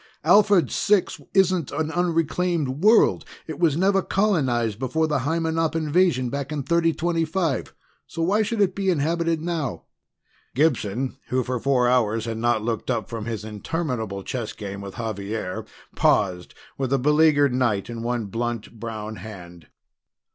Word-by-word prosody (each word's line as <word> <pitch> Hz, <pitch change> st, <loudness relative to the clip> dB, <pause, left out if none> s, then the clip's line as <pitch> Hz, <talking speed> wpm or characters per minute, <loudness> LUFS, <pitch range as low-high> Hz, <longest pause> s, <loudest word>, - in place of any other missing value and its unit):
Alphard 205 Hz, -4 st, +5 dB
Six 205 Hz, -3 st, +1 dB
isn't 185 Hz, -5 st, +3 dB
an 155 Hz, +2 st, -2 dB
unreclaimed 165 Hz, -3 st, 0 dB
world 220 Hz, +2 st, +5 dB, 0.2 s
it 160 Hz, -3 st, -7 dB
was 160 Hz, -4 st, +2 dB
never 195 Hz, +2 st, +3 dB
colonized 130 Hz, -, 0 dB
before 135 Hz, +5 st, 0 dB
the 150 Hz, -3 st, 0 dB
Hymenop 160 Hz, +3 st, 0 dB
invasion 155 Hz, -5 st, +2 dB
back 140 Hz, +1 st, -4 dB
in 150 Hz, -2 st, -2 dB
3025, 165 Hz, 0 st, 0 dB, 0.3 s
so 165 Hz, -, -3 dB
why 200 Hz, +6 st, +2 dB
should 215 Hz, 0 st, -1 dB
it 190 Hz, -2 st, +3 dB
be 195 Hz, 0 st, -1 dB
inhabited 165 Hz, 0 st, 0 dB
now?" 160 Hz, -7 st, -3 dB, 0.7 s
Gibson, 130 Hz, -4 st, 0 dB
who 130 Hz, 0 st, 0 dB
for 125 Hz, +1 st, -2 dB
four 125 Hz, -1 st, +2 dB
hours 115 Hz, -3 st, +2 dB
had 115 Hz, -1 st, -4 dB
not 120 Hz, -2 st, +1 dB
looked 115 Hz, 0 st, -3 dB
up 115 Hz, -5 st, -1 dB
from 115 Hz, -2 st, -5 dB
his 110 Hz, -3 st, -4 dB
interminable 110 Hz, -, -3 dB
chess 120 Hz, -1 st, -4 dB
game 100 Hz, -1 st, -7 dB
with 100 Hz, -1 st, -8 dB
Xavier, 105 Hz, -3 st, -4 dB, 0.3 s
paused 90 Hz, -3 st, +1 dB, 0.2 s
with 135 Hz, -1 st, -1 dB
a 135 Hz, -, +3 dB
beleaguered 150 Hz, 0 st, +4 dB
knight 120 Hz, -6 st, 0 dB
in 115 Hz, -1 st, -6 dB
one 120 Hz, -1 st, -2 dB
blunt 115 Hz, +1 st, -4 dB
brown 110 Hz, -1 st, -6 dB
hand. 90 Hz, -4 st, -11 dB
135 Hz, 145 wpm, -24 LUFS, 115-165 Hz, 0.7 s, Alphard